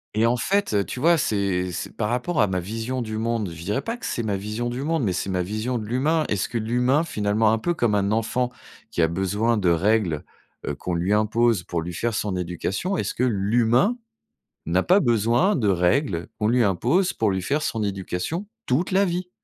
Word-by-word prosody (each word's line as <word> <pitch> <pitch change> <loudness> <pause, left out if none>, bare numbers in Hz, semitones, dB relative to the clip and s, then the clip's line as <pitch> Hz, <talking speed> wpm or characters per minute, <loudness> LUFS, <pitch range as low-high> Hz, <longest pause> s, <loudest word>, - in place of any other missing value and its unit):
Et 110 +1 +3
en 120 +1 +2
fait, 200 - 0
heu, 100 -1 +3
tu 125 - -6
vois, 170 +4 +4
c'est 95 -6 0
c'est - - -6
par 105 -2 -1
rapport 125 +7 0
à 105 - +4
ma 90 -1 -1
vision 115 +7 -3
du 110 -1 -4
monde, 115 -4 -1
je 80 0 -9
dirais 105 +9 -1
pas 230 - -3
que 240 - -9
c'est 115 - -2
ma 100 -3 -1
vision 105 +4 -3
du 120 +2 -4
monde, 160 0 0
mais 95 -5 +1
c'est 95 - -2
ma 90 -1 0
vision 110 +6 -2
de 110 - -5
l'humain. 150 +7 +1
Est-ce 100 -3 -1
que 120 - -2
l'humain, 125 +6 +2
finalement, 105 -6 +1
un 110 - +1
peu 175 +8 -1
comme 120 -7 +1
un 100 0 +1
enfant 120 +3 0 0.4
qui 85 - 0
a 80 - +4
besoin 100 +6 0
de 95 -4 +2
règles, 90 -2 +1 0.4
heu, - - -2
qu'on 90 -1 -4
lui 90 +4 +1
impose 110 -1 +2
pour 85 -1 -3
lui 90 - -6
faire 115 +5 -1
son 100 -3 -1
éducation, 90 - -2
est - - 0
ce - - -3
que 125 - -1
l'humain 120 - +2 0.7
n'a 90 +3 +1
pas 190 +3 +5
besoin 120 - +2
de 110 -8 +1
règles 90 - +1
qu'on 105 0 +1
lui 125 0 +3
impose 125 - +1
pour 110 -3 +1
lui 95 0 -1
faire 145 +11 0
son 115 -6 -2
éducation 100 - -3 0.2
toute 145 +10 0
la 195 +2 +4
vie? 180 0 -3
110 Hz, 225 wpm, -24 LUFS, 95-125 Hz, 0.7 s, pas